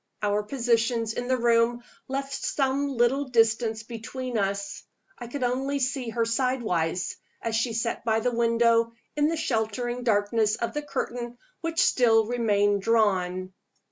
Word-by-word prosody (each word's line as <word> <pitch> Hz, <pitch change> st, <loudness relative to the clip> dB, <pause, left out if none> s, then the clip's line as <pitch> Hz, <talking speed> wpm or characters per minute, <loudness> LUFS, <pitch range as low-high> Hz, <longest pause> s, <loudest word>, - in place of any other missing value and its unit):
Our 205 Hz, 0 st, +2 dB
positions 230 Hz, -1 st, 0 dB
in 245 Hz, +1 st, -4 dB
the 255 Hz, 0 st, +2 dB
room 235 Hz, 0 st, +2 dB, 0.2 s
left 275 Hz, +1 st, -3 dB
some 275 Hz, 0 st, 0 dB
little 265 Hz, +1 st, +1 dB
distance 225 Hz, -2 st, +2 dB
between 245 Hz, +2 st, -6 dB
us. 200 Hz, -1 st, -2 dB, 0.4 s
I 240 Hz, -, -7 dB
could 260 Hz, +2 st, -4 dB
only 265 Hz, +3 st, 0 dB
see 260 Hz, -2 st, -1 dB
her 230 Hz, 0 st, 0 dB
sidewise, 225 Hz, -9 st, -1 dB, 0.2 s
as 230 Hz, -1 st, -2 dB
she 230 Hz, +1 st, 0 dB
sat 230 Hz, +1 st, -2 dB
by 220 Hz, -1 st, +2 dB
the 245 Hz, +2 st, -1 dB
window 230 Hz, 0 st, +3 dB, 0.2 s
in 295 Hz, 0 st, +3 dB
the 330 Hz, +1 st, -1 dB
sheltering 240 Hz, -1 st, -1 dB
darkness 215 Hz, -1 st, +2 dB
of 235 Hz, -, -3 dB
the 295 Hz, -, -2 dB
curtain 245 Hz, -4 st, -4 dB, 0.2 s
which 330 Hz, 0 st, -2 dB
still 225 Hz, -3 st, +4 dB
remained 205 Hz, -4 st, +1 dB
drawn. 190 Hz, -4 st, +1 dB
230 Hz, 145 wpm, -26 LUFS, 220-250 Hz, 0.4 s, still